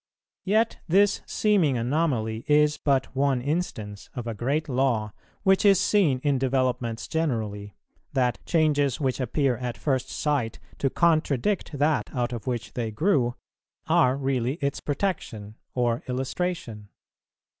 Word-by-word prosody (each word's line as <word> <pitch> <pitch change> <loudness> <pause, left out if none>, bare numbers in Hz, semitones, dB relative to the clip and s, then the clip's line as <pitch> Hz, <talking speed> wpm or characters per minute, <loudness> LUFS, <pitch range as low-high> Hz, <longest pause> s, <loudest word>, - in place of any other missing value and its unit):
Yet 220 +4 +2
this 195 +4 +3
seeming 185 - +2
anomaly 120 -4 0
is 150 0 +3
but 135 -2 0
one 135 -1 +2
instance 120 - -3
of 120 - -4
a 115 - -3
great 140 +9 -1
law 125 -6 0 0.3
which 190 -1 +4
is 200 -3 +6
seen 195 -10 +3
in 140 -3 +2
developments 130 -3 -1
generally, 110 - -2 0.4
that 125 -4 0
changes 150 -4 +2
which 135 -3 -1
appear 130 0 0
at 120 -1 -4
first 130 -3 -1
sight 140 -7 -1 0.2
to 135 - +1
contradict 160 - +1
that 150 +2 +1
out 120 -1 -1
of 120 +1 -6
which 120 -2 -3
they 115 -3 -2
grew, 120 - +1 0.5
are 130 +1 +3
really 135 -1 0
its 140 -4 -2
protection 125 - -3 0.2
or 120 -1 +1
illustration. 130 - -3
135 Hz, 135 wpm, -26 LUFS, 120-155 Hz, 0.5 s, is